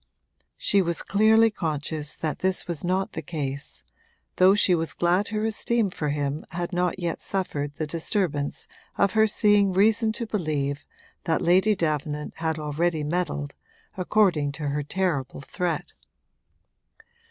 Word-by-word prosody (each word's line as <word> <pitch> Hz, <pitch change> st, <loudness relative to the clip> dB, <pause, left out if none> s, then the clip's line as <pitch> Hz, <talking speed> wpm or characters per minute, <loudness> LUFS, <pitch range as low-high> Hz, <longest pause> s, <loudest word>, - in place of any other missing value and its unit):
She 200 Hz, -, +2 dB
was 170 Hz, -2 st, -1 dB
clearly 220 Hz, +2 st, +4 dB
conscious 150 Hz, -4 st, -3 dB
that 155 Hz, -2 st, -3 dB
this 190 Hz, 0 st, +1 dB
was 170 Hz, -4 st, -3 dB
not 185 Hz, +2 st, 0 dB
the -, -, -5 dB
case; 140 Hz, -4 st, -4 dB, 0.5 s
though 185 Hz, +2 st, +6 dB
she 200 Hz, -3 st, +4 dB
was 165 Hz, -6 st, 0 dB
glad 180 Hz, +4 st, +1 dB
her 215 Hz, 0 st, -2 dB
esteem 225 Hz, -1 st, +1 dB
for 150 Hz, -4 st, -3 dB
him 145 Hz, 0 st, -2 dB
had 175 Hz, +2 st, -4 dB
not 180 Hz, 0 st, 0 dB
yet 170 Hz, -3 st, -3 dB
suffered 145 Hz, -7 st, -3 dB
the 155 Hz, -, -2 dB
disturbance 160 Hz, -2 st, -2 dB, 0.3 s
of 200 Hz, -1 st, +2 dB
her 220 Hz, 0 st, +5 dB
seeing 205 Hz, -2 st, +3 dB
reason 220 Hz, +3 st, +3 dB
to 235 Hz, -, -4 dB
believe 150 Hz, -9 st, -2 dB, 0.4 s
that 160 Hz, -, +1 dB
Lady 190 Hz, +5 st, +4 dB
Davenant 150 Hz, -3 st, -2 dB
had 160 Hz, -1 st, -1 dB
already 155 Hz, +1 st, -1 dB
meddled, 150 Hz, -3 st, -2 dB, 0.4 s
according 180 Hz, -6 st, +2 dB
to 150 Hz, -1 st, -3 dB
her 145 Hz, +1 st, -1 dB
terrible 145 Hz, -5 st, -2 dB
threat. 170 Hz, +2 st, -3 dB
170 Hz, 140 wpm, -25 LUFS, 150-195 Hz, 0.5 s, though